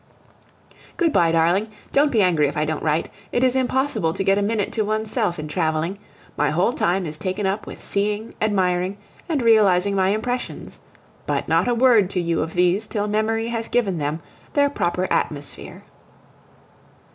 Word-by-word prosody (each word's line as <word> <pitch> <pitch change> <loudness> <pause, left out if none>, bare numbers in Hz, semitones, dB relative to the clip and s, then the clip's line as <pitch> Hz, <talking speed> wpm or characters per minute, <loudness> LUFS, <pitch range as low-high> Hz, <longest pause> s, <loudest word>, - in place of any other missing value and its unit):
Good 330 -4 +1
bye, 165 -1 +3
darling. 170 +6 +2 0.2
Don't 285 +1 +3
be 220 -4 +3
angry 165 -5 +3
if 140 - -5
I 150 - +1
don't 155 0 -3
write. 155 +1 0 0.2
It 245 - +1
is 255 0 +3
impossible 260 - 0
to 195 - -2
get 195 +1 +3
a - - 0
minute 205 0 -1
to 225 - +1
oneself 215 -2 -1
in 155 -1 -5
traveling; 160 +3 -1 0.4
my 150 0 +1
whole 180 +9 +1
time 180 -2 0
is 155 -1 -4
taken 190 +2 -2
up 195 +3 -2
with - - -9
seeing, 210 +2 -2
admiring, 190 -2 0 0.3
and 295 -6 0
realizing 200 -4 +4
my 190 -1 +2
impressions. 245 +5 -3 0.5
But - - -1
not - - +2
a 245 - +2
word 230 -6 +4
to 185 - -2
you 170 -2 0
of 160 +1 -4
these 180 +4 +2
till 210 -1 -2
memory 225 +2 0
has 230 -1 -3
given 200 -8 0
them 150 +2 -2 0.3
their 285 -1 +3
proper 180 -6 -1
atmosphere. 145 -1 -3
200 Hz, 175 wpm, -22 LUFS, 170-225 Hz, 0.5 s, realizing